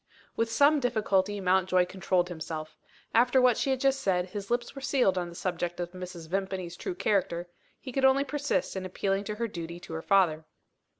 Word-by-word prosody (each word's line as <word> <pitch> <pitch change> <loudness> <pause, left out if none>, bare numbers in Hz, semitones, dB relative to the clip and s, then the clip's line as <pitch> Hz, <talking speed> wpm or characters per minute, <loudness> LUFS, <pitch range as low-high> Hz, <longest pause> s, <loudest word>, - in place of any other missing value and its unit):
With 230 0 0
some 290 +5 +5
difficulty, 205 -5 +1
Mountjoy 185 -1 +3
controlled 180 -1 0
himself. 160 -2 -6 0.4
After 245 +3 +4
what 250 -2 +5
she - - -1
had 265 -1 +1
just 270 0 +2
said, 180 -1 +1
his 200 -2 -6
lips 240 0 -1
were 275 - -8
sealed 255 -8 +2
on 175 -1 -2
the 170 - -11
subject 175 -1 -3
of 175 0 -3
Mrs. 180 -3 -8
Vimpany's 185 -1 -3
true 360 - -5
character. 185 - 0 0.3
He 260 - -8
could 270 +2 -1
only 265 +1 +5
persist 290 -5 -1
in 190 - -3
appealing 195 +2 -1
to 210 - -3
her 230 +2 -2
duty 170 -4 -7
to 165 - -9
her 160 - -3
father. 165 -6 +3
190 Hz, 195 wpm, -29 LUFS, 175-245 Hz, 0.4 s, some